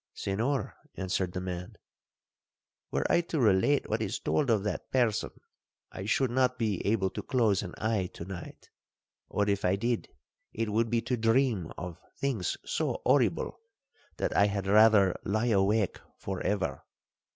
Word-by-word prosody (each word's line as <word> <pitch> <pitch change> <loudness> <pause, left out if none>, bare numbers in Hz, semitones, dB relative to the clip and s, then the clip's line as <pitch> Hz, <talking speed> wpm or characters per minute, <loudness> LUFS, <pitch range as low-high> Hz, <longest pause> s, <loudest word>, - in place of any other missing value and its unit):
'—'Senhor,' 120 +8 -1 0.2
answered 95 -1 -1
the - - -2
man, 90 -1 -5 1.1
'were - - -1
I 170 - +3
to 165 -2 -3
relate 115 +5 +3
what 110 +1 -1
is 110 +2 -1
told 145 -4 0
of 110 -4 +3
that 105 -4 -3
person, 120 -5 +1 0.6
I 95 - -6
should 125 +4 +1
not 125 0 +2
be 105 -5 -1
able 100 -3 +1
to - - -5
close 115 -7 +2
an 90 -4 -7
eye 105 -5 0
to 85 - -7
night; 90 -3 -9 0.6
or 105 0 0
if 100 0 0
I 90 +1 +3
did, 115 +3 -1 0.4
it 115 -1 -2
would 115 +2 +1
be 115 0 +1
to 125 +1 -1
dream 115 -6 +2
of 90 -2 -6 0.2
things 120 - -1
so - - -1
horrible, - - +2 0.6
that - - -1
I 100 - +5
had 100 -1 -2
rather 105 -2 +5
lie 110 +4 0
awake 100 0 +2 0.2
for 95 -2 -5
ever. 100 -2 -1
105 Hz, 160 wpm, -29 LUFS, 95-115 Hz, 1.1 s, I